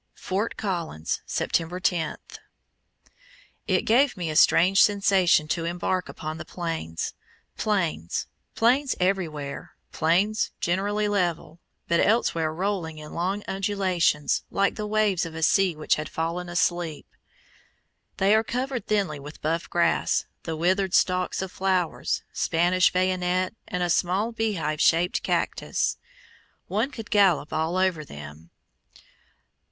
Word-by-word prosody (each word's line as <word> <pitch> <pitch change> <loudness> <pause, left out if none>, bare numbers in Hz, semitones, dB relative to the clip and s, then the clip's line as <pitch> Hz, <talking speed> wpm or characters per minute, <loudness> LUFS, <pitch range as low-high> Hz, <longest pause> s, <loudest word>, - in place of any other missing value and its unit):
FORT 200 +5 -3
COLLINS, 170 - -3
September 170 +2 -1
10. 170 -4 0 1.5
It - - +2
gave 245 +2 +3
me 170 -3 -2
a - - -5
strange 185 +5 +5
sensation 195 -6 +4
to 165 +1 -1
embark 175 +2 -2
upon 155 +1 -6
the - - -5
Plains. 165 - -4 0.4
Plains, 170 - -1 0.3
plains 255 +4 +2
everywhere, 165 -7 -2 0.2
plains 185 +7 +1
generally 205 +4 0
level, 175 -5 -1 0.3
but 170 0 +2
elsewhere 170 -8 +2
rolling 175 -2 -2
in 150 0 -9
long 190 +4 -2
undulations, 190 -6 +1
like 200 0 +1
the 210 - -4
waves 210 -4 +1
of 165 -1 -6
a 160 - -3
sea 190 0 +3
which 155 - +1
had 150 - -4
fallen 170 +2 -3
asleep. 175 -2 -1 1.1
They 195 +2 +4
are 220 +1 +4
covered 250 +2 -3
thinly 195 -8 0
with 145 +2 -10
buff 165 +2 -1
grass, 175 - +1 0.2
the 160 - -4
withered 185 +3 +1
stalks 185 0 +1
of 190 - -6
flowers, 185 -3 -1
Spanish 175 +2 +2
bayonet, 185 0 0
and 180 0 -2
a 175 - 0
small 190 +7 +1
beehive 190 -10 -1
shaped 170 +2 +3
cactus. - - -1 0.7
One 220 +7 0
could 225 -7 -9
gallop 185 -8 +3
all 160 +3 0
over 185 -4 +1
them. 75 - -11
180 Hz, 125 wpm, -25 LUFS, 165-200 Hz, 1.5 s, strange